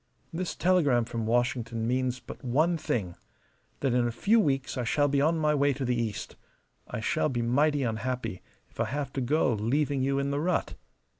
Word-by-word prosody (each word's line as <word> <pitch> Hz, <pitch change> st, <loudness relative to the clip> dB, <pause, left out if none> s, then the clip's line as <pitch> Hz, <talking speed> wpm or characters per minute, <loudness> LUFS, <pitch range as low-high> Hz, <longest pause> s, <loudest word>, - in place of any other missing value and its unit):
This 180 Hz, +2 st, -3 dB
telegram 150 Hz, -10 st, +3 dB
from 115 Hz, -1 st, -4 dB
Washington 115 Hz, -1 st, 0 dB
means 125 Hz, +1 st, 0 dB
but -, -, -11 dB
one 155 Hz, +8 st, +2 dB
thing: 100 Hz, -, -2 dB, 0.7 s
that 135 Hz, -3 st, +1 dB
in 125 Hz, -1 st, +2 dB
a -, -, -1 dB
few 205 Hz, -, +3 dB
weeks 135 Hz, -8 st, 0 dB
I 125 Hz, -, -2 dB
shall 145 Hz, +5 st, +2 dB
be 140 Hz, 0 st, +1 dB
on 160 Hz, +3 st, +2 dB
my 150 Hz, -1 st, +2 dB
way 140 Hz, -1 st, +3 dB
to 135 Hz, 0 st, -3 dB
the 125 Hz, 0 st, +1 dB
East. 115 Hz, -4 st, -3 dB, 0.5 s
I -, -, -5 dB
shall 155 Hz, +7 st, +1 dB
be 120 Hz, -3 st, -1 dB
mighty 145 Hz, +4 st, +2 dB
unhappy 115 Hz, -3 st, -3 dB, 0.3 s
if -, -, -25 dB
I -, -, +2 dB
have 140 Hz, 0 st, -3 dB
to 135 Hz, -, -2 dB
go 130 Hz, 0 st, +2 dB
leaving 135 Hz, +6 st, 0 dB
you 135 Hz, +1 st, +1 dB
in 140 Hz, 0 st, 0 dB
the 140 Hz, -, 0 dB
rut. 180 Hz, +4 st, 0 dB
130 Hz, 200 wpm, -28 LUFS, 120-145 Hz, 0.7 s, telegram